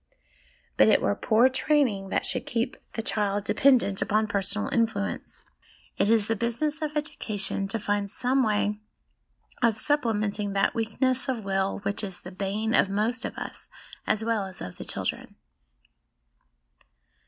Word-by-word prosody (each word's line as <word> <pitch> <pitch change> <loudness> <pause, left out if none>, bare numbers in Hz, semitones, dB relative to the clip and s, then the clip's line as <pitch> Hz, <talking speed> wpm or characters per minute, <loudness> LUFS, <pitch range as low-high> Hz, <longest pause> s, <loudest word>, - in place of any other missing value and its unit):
But - - +6
it - - +5
were 100 - +1
poor 225 - +4
training 260 -8 +1
that - - 0
should 255 - -2
keep 235 +1 -1 0.2
the 225 - -3
child 205 -2 0
dependent 240 -4 +3
upon 215 +1 +2
personal 205 0 +1
influence. 160 - -2 0.5
It 205 - +2
is 225 -2 +4
the 225 - 0
business 245 +9 -1
of 300 -1 -2
education 210 -9 -1
to 195 - +3
find 205 -1 -1
some 255 +6 +1
way 210 -2 +1 0.8
of 230 -3 +3
supplementing 215 -7 0
that 195 - +2
weakness 255 +4 0
of 240 -4 -2
will 195 0 -1
which 200 +2 -1
is 190 -3 -4
the 185 - -9
bane 205 +4 -2
of 195 - +4
most 220 +5 0
of - - -6
us - - -5 0.4
as 215 +1 +1
well 220 -4 0
as 185 - -11
of 90 - -7
the - - -7
children. - - -3
215 Hz, 155 wpm, -27 LUFS, 200-240 Hz, 0.8 s, But